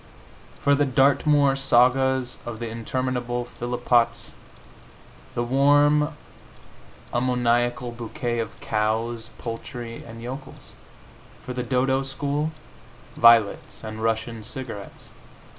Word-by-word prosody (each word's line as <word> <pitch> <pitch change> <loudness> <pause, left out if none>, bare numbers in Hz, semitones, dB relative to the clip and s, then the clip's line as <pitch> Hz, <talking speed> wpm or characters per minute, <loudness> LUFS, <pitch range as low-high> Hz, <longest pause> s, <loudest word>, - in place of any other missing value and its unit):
For 140 - +4
the 145 +1 +3
Dartmoor 140 +1 +3
sagas 130 -1 +3
of 120 -2 -6
the 120 +1 -4
interminable 120 +1 -2
Phillpotts, 120 0 0 1.0
the 120 - 0
warm 145 +4 +4 1.0
ammoniacal 120 0 +1
bouquet 120 0 -3
of 110 0 -5
cows, 110 +2 -1
poultry 115 0 -6
and 115 0 -10
yokels. 130 +4 -8 0.7
For 125 - -4
the 125 - -3
"Dodo" 130 +2 +1
school, 145 +3 -2 0.6
violets 115 -3 +4
and 110 0 -6
Russian 115 0 -1
cigarettes. 115 -5 -8
120 Hz, 95 wpm, -24 LUFS, 115-135 Hz, 1.0 s, For